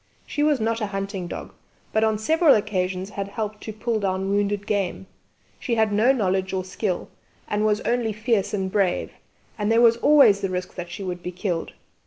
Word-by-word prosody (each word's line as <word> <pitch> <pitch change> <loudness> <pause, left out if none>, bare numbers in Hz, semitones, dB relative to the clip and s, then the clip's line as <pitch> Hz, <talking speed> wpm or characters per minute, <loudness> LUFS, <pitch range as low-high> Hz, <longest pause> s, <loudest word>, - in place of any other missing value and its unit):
She 295 - -3
was 295 -2 +3
not 225 +1 -1
a 210 - 0
hunting 195 -2 -4
dog, - - -7 0.4
but 220 - +3
on 220 -1 +2
several 315 +7 +4
occasions 190 -2 -1
had 200 -1 -4
helped 210 0 -5
to 220 - -6
pull 220 +1 -2
down 190 -1 -1
wounded 205 0 0
game; 200 -3 -1 0.5
she 240 - -1
had 220 -2 +2
no 220 +5 +4
knowledge 190 -6 0
or 185 -1 -1
skill, 185 -1 -3 0.4
and 210 +1 0
was 210 0 +1
only 240 -2 0
fierce 215 -2 0
and 190 -2 -2
brave, 190 -3 0 0.5
and 210 +1 +1
there 230 - +4
was 235 -1 +6
always 235 -7 +6
the 195 - -1
risk 180 0 -4
that 175 -1 -6
she 175 +3 -6
would 180 -1 -4
be 180 - -5
killed. 180 -2 -3
205 Hz, 200 wpm, -24 LUFS, 190-220 Hz, 0.5 s, was